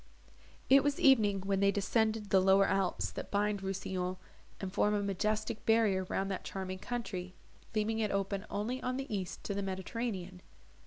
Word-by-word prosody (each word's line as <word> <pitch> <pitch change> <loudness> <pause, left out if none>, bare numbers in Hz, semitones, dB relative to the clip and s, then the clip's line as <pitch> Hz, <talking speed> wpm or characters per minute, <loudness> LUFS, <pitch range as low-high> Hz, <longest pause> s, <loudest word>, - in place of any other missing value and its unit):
It 275 0 +7
was 290 0 0
evening 215 -8 +5
when 195 0 0
they 200 0 +4
descended 215 +1 0
the 190 - +6
lower 195 +1 +5
alps, 195 -2 0
that - - -7
bind 205 0 0
Rousillon, 185 -1 -3 0.4
and 190 -1 -5
form 210 +1 +2
a 205 - 0
majestic 215 +3 -1
barrier 215 -4 +3
round 195 +1 -2
that 190 - -4
charming 185 -1 -5
country, 190 -6 -4 0.4
leaving 220 +1 +1
it 215 -1 +1
open 195 +1 -2
only 230 +6 -2
on 255 +1 -2
the 270 -5 -3
east 185 -3 -5
to 200 - -3
the 200 - -2
Mediterranean. 190 -1 -4
200 Hz, 170 wpm, -33 LUFS, 190-220 Hz, 0.4 s, It